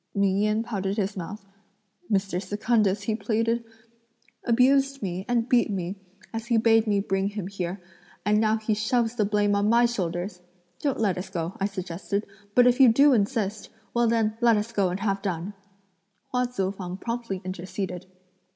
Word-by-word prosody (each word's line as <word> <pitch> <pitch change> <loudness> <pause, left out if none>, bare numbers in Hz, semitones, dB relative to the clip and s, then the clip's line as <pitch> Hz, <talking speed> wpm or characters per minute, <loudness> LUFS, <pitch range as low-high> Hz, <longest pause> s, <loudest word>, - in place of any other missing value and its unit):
Ming 200 -1 +2
Yen 215 +2 +1
pouted 200 -3 -3
his 200 -1 -1
mouth. 195 +3 -7 0.7
"Mr. 195 -2 0
Secundus," 205 0 +1
he 220 - 0
pleaded, 230 +2 0 0.8
"abused 270 +2 +3
me 185 0 -3
and 235 -1 +1
beat 245 -2 +3
me, 190 -1 -3 0.4
as 225 +1 -4
he 235 -2 +3
bade 225 0 +4
me 205 -1 +2
bring 195 0 0
him 205 -2 -4
here, 185 -1 -4 0.5
and 210 +1 +3
now 220 0 +3
he 220 0 -1
shoves 225 +2 +1
the 220 -4 +1
blame 205 0 +2
on 205 +1 +2
my 235 +1 +5
shoulders! 180 -4 -3 0.4
'Don't 280 -3 -1
let 200 -5 +1
us 190 - -6
go,' 170 -1 -4
I 195 - +1
suggested; 195 +1 -4 0.3
'but 245 - +7
if 250 +1 +4
you 260 -3 +8
do 280 +4 +5
insist, 215 -2 0 0.2
well 235 0 +3
then 225 -2 +1
let 235 -2 +5
us 210 +2 -2
go 200 -5 +1
and 180 +2 -3
have 195 -2 0
done.'" 190 0 -3 0.8
Hua 250 0 +1
Tzu 195 -6 -2
fang 185 -2 -6
promptly 230 -3 -4
interceded. 185 0 -5
210 Hz, 175 wpm, -26 LUFS, 195-230 Hz, 0.8 s, you